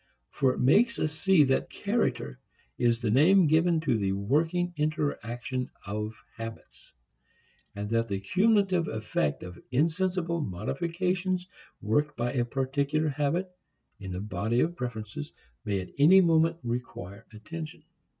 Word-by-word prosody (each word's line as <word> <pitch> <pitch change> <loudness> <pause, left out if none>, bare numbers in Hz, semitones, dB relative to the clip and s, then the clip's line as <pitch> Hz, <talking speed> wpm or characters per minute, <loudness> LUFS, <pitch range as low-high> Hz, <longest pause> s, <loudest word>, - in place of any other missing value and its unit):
For 130 -1 +1
it - - -6
makes 225 - +4
us 155 - -1
see 185 0 +4
that 135 -1 +1
character 135 - -1 0.4
is 120 -2 +2
the 110 -3 0
name 170 - +6
given 160 +2 +3
to 130 -8 +1
the 95 -1 0
working 160 - 0
interaction 130 -5 -2 0.2
of 105 +2 -4
habits, 115 0 -10 0.8
and 100 0 -4
that 115 0 +1
the 100 -2 -2
cumulative 190 - +2
effect 105 -9 -2
of 90 0 -9
insensible 170 +4 0
modifications 180 - -2 0.4
worked 145 +8 0
by 120 +1 -1
a 125 -3 +1
particular 140 +4 0
habit 150 +6 -1 0.5
in 95 -2 -7
the 90 +1 -4
body 105 +4 0
of 170 +2 0
preferences 110 - -6 0.3
may 100 -2 0
at 90 - -10
any 170 +7 +8
moment 165 -2 +3
require 115 -5 -5
attention. 155 +8 -8
140 Hz, 135 wpm, -28 LUFS, 110-170 Hz, 0.8 s, any